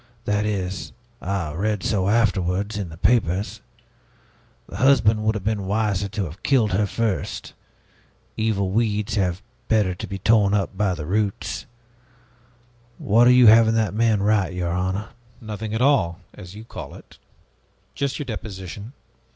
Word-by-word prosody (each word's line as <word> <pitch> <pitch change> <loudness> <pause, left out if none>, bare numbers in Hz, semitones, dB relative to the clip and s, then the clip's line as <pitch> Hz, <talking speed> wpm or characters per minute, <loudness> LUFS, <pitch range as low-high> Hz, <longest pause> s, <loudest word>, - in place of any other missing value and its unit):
That 105 0 0
is 95 -2 -3 0.3
I 90 -5 -3
read 105 +4 -1
so 100 -2 0
afterwards, 100 -2 +1
in 100 -4 -4
the 80 - -11
papers. 100 0 +1 1.0
The 90 - -9
husband 115 -4 +4
would 110 0 +1
have 105 - -4
been 105 -2 -2
wiser 105 -1 0
to 105 -1 -3
have 85 +4 -10
killed 120 -7 +2
her 100 +3 +1
first. 110 -2 -3 0.8
Evil 100 -4 0
weeds 105 0 0
had 90 -4 0 0.3
better 105 -5 +2
be 100 - -5
torn 105 0 +3
up 100 -1 -1
by 95 -2 0
the 75 -3 -6
roots. 100 +3 -2 1.3
What 115 +4 +4
are - - +7
you 125 -1 +6
having 110 0 +7
that 110 -4 +1
man 110 -2 +2
write, 100 -3 +2
your 90 -1 -2
honor?" 95 +4 -2 0.3
"Nothing 110 -1 -6
at 110 +3 0
all, 95 -12 +2
as 90 +2 -11
you 110 - -9
call - - -9
it. - - -16 0.7
Just 140 -1 -2
your 145 - -4
deposition. 105 -1 -7
105 Hz, 150 wpm, -23 LUFS, 95-110 Hz, 1.3 s, are